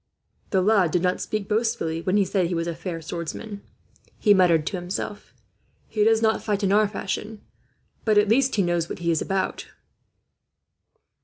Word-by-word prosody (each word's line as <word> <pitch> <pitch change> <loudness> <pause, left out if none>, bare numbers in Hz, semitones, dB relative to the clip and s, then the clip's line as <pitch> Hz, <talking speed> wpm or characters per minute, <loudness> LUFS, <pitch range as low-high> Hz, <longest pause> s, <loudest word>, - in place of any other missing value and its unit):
"The 190 -2 +2
lad 200 -4 +4
did 175 +3 0
not 180 0 0
speak 215 -2 -3
boastfully, 215 -7 -1
when 185 +3 +1
he 200 - +3
said 185 -2 0
he 175 - -2
was 165 0 -1
a 170 - -2
fair 165 0 -6
swordsman," 175 +6 -6 0.6
he 210 - +5
muttered 170 -5 +4
to 200 - -2
himself. 185 +3 -5 0.6
"He 210 - 0
does 225 +1 +3
not 220 0 +2
fight 205 -1 -1
in 195 - +2
our 210 +1 +4
fashion, 210 +1 -5 0.6
but 215 -2 +2
at 210 0 +5
least 260 +5 +3
he 200 - +2
knows 175 -1 0
what - - -5
he 170 -1 0
is 160 - 0
about." 195 0 -2
195 Hz, 180 wpm, -24 LUFS, 175-215 Hz, 0.6 s, he